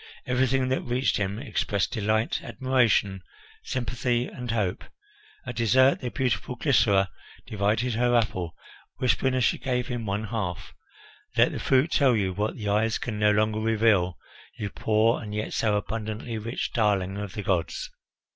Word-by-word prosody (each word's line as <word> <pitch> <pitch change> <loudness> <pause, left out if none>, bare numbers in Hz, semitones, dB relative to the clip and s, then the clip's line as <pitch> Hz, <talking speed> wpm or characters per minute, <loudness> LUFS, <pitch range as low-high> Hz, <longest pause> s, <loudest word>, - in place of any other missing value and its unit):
Everything 130 +1 +1
that 130 - 0
reached 125 +2 0
him 100 0 -2
expressed 105 -6 -1
delight, 110 0 0
admiration, 120 -7 +1 0.4
sympathy, 120 0 -1
and 125 -1 -7
hope. 105 -5 -1 0.6
At 120 - -5
dessert 130 +4 +4
the 125 - -3
beautiful 125 -1 -1
Glycera 100 -10 +3 0.3
divided 110 +4 0
her 120 +2 +2
apple, 95 -8 0 0.4
whispering 130 +1 +1
as 130 - +1
she - - +2
gave 125 -2 -1
him 120 -3 -3
one 100 +2 -1
half, 105 -5 -4 0.6
"Let - - +5
the - - -4
fruit 135 +5 +2
tell 135 -4 +4
you 95 -3 0
what 105 +3 -2
the 105 -3 -5
eyes 110 +2 +2
can 110 -3 -4
no 105 0 +4
longer 110 +1 +2
reveal, 110 -6 +2 0.4
you 105 -2 -4
poor 110 +2 +2
and 105 -2 -6
yet 105 - -3
so 110 -2 +1
abundantly 110 +2 -4
rich 115 +3 -4
darling 100 -4 +1
of 105 -2 -6
the 105 - -5
gods." 90 -3 -1
110 Hz, 155 wpm, -26 LUFS, 105-125 Hz, 0.6 s, Let